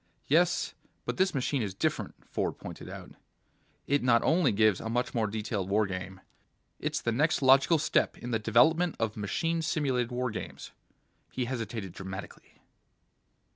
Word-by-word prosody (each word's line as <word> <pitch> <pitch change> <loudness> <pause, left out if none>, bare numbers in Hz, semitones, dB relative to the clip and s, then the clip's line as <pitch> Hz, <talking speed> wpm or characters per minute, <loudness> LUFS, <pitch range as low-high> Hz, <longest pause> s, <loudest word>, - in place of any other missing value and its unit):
"Yes, - - +2 0.3
but - - -3
this 190 -3 +2
machine 135 0 0
is 100 -3 -3
different," - - -1
Ford - - -2
pointed - - -9
out. - - -9 0.7
"It 145 0 +2
not 120 -2 +4
only 160 -3 +3
gives 105 -2 +3
a 110 - -4
much 120 +2 -1
more 115 -3 +1
detailed 105 -2 -3
war 105 +2 +3
game. 95 0 -6 0.6
It's - - -1
the 120 - 0
next 145 +5 +1
logical 135 +5 +6
step 155 - +1
in 125 - -6
the 115 - +1
development 160 +11 +3
of 110 -2 -1
machine 165 - -1
simulated 135 -7 0
war 125 0 -1
games." 110 - -7 0.6
He 125 - -2
hesitated 115 -5 -4
dramatically. 95 +1 -9
120 Hz, 155 wpm, -29 LUFS, 105-140 Hz, 0.7 s, logical